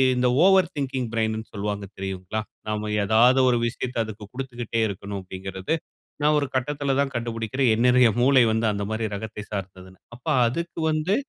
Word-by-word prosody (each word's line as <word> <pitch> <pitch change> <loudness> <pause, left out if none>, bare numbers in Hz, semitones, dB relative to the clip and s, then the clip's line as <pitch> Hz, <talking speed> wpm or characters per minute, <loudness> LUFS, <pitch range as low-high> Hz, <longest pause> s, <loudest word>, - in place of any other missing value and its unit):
இந்த 125 0 +2 0.2
over 190 -2 +5
thinking 130 -3 -2
பிரெயின்னு 110 0 -1
சொல்லுவாங்க 100 -1 -3
தெரியுங்கலா? 95 +2 -4 0.3
நாம 105 0 -2
ஏதாவது 115 +6 +5
ஒரு 120 - +3
விஷயத்தை 125 +1 -4
அதுக்கு 110 -1 -9
குடுத்துகிட்டே 120 -3 -4
இருக்கணும் 100 0 -5
அப்படிங்கிறது. 95 - -5 0.5
நான் 150 +1 +4
ஒரு 145 - 0
கட்டத்துல 140 +1 0
தான் 140 -1 +1
கண்டுபிடிக்கிறேன். 115 +2 0
என்னுடைய 125 +1 +5
மூளை 130 0 +5
வந்து 110 +1 +1
அந்த 100 0 -3
மாரி 110 +1 -1
ரகத்தை 105 +1 -6
சார்ந்ததுனு. 95 -2 -7 0.2
அப்ப 125 - -19 0.2
அதுக்கு 170 +8 -4
வந்து 155 +6 +1
115 Hz, 155 wpm, -24 LUFS, 105-130 Hz, 0.5 s, over